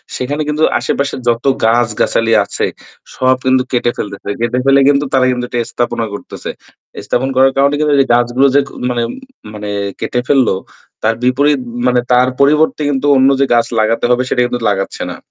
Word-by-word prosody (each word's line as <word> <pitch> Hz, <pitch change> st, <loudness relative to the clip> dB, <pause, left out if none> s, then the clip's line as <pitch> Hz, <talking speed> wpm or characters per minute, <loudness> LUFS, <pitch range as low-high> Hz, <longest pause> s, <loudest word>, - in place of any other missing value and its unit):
সেখানে 145 Hz, +4 st, -3 dB
কিন্তু 155 Hz, +1 st, 0 dB, 0.2 s
আশেপাশে 140 Hz, +3 st, -2 dB
যত 120 Hz, +2 st, 0 dB, 0.2 s
গাছগাছালি 115 Hz, 0 st, +1 dB
আছে -, -, -2 dB, 0.5 s
সব 130 Hz, 0 st, +2 dB
কিন্তু 130 Hz, 0 st, +3 dB
কেটে 120 Hz, -1 st, +1 dB
ফেলতেছে। 100 Hz, -1 st, -6 dB
কেটে 120 Hz, +2 st, 0 dB
ফেলে 135 Hz, 0 st, +5 dB
কিন্তু 145 Hz, +1 st, +2 dB
তারা 130 Hz, -1 st, +3 dB
কিন্তু 125 Hz, 0 st, -3 dB
এটা 120 Hz, -, -2 dB
স্থাপনা 120 Hz, -1 st, -2 dB
করতেছে। 100 Hz, -, -8 dB, 0.6 s
স্থাপন 130 Hz, +2 st, -1 dB
করার 135 Hz, +1 st, +4 dB
কারণে 140 Hz, +1 st, +3 dB
কিন্তু 150 Hz, -1 st, +1 dB
এই -, -, -9 dB
গাছগুলো 120 Hz, +3 st, +2 dB
যে -, -, +6 dB, 0.3 s
মানে 120 Hz, -1 st, -1 dB
উ -, -, -4 dB, 0.4 s
মানে 105 Hz, 0 st, -6 dB, 0.3 s
কেটে 125 Hz, -, -2 dB
ফেললো 130 Hz, -8 st, +3 dB, 0.5 s
তার 115 Hz, +1 st, +2 dB
বিপরীত 140 Hz, +3 st, +2 dB, 0.3 s
মানে 125 Hz, 0 st, +3 dB
তার 125 Hz, +1 st, +4 dB
পরিবর্তে 150 Hz, +2 st, +3 dB
কিন্তু 140 Hz, 0 st, -1 dB
অন্য 130 Hz, +1 st, +4 dB
যে 140 Hz, -, +3 dB
গাছ 120 Hz, -1 st, +3 dB
লাগাতে 110 Hz, +2 st, +1 dB
হবে 125 Hz, +1 st, +2 dB
সেটা 125 Hz, -, +1 dB
কিন্তু 125 Hz, 0 st, -3 dB
লাগাচ্ছে 95 Hz, -1 st, -3 dB
না। -, -, -8 dB
125 Hz, 175 wpm, -14 LUFS, 120-140 Hz, 0.6 s, যে